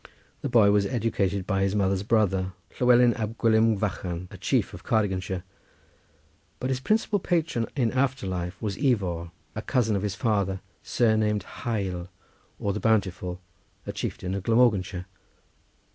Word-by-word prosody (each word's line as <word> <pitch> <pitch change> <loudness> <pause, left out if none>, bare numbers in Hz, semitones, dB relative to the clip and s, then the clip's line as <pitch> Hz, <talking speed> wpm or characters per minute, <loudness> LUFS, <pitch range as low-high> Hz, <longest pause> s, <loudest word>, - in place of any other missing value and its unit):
The - - -2
boy 105 -4 +6
was 100 -1 +3
educated 100 -5 0
by 95 -1 0
his 95 +1 +1
mother's 95 -2 +1
brother, 95 -4 +1 0.3
Llewelyn 125 -1 +6
ab 110 0 -4
Gwilym 110 -1 +4
Fychan, 90 -3 -3
a - - -9
chief - - +1
of - - -10
Cardiganshire; 95 -4 0 1.2
but 130 +1 -1
his 130 - 0
principal 215 +7 +1
patron 165 - 0
in 120 -5 +1
after 130 -3 0
life 90 -1 -3
was 100 -3 -3
Ifor, 95 - 0 0.2
a 110 - -4
cousin 115 -3 +1
of 100 - 0
his 100 -2 -2
father, 100 -4 0 0.2
surnamed 110 -3 +2
Hael 95 -7 -3 0.5
or 100 - -1
the 105 - -3
bountiful, 95 -5 0 0.4
a - - -3
chieftain 90 +1 -4
of 100 - -2
Glamorganshire. 100 -5 +2
105 Hz, 145 wpm, -26 LUFS, 95-115 Hz, 1.2 s, boy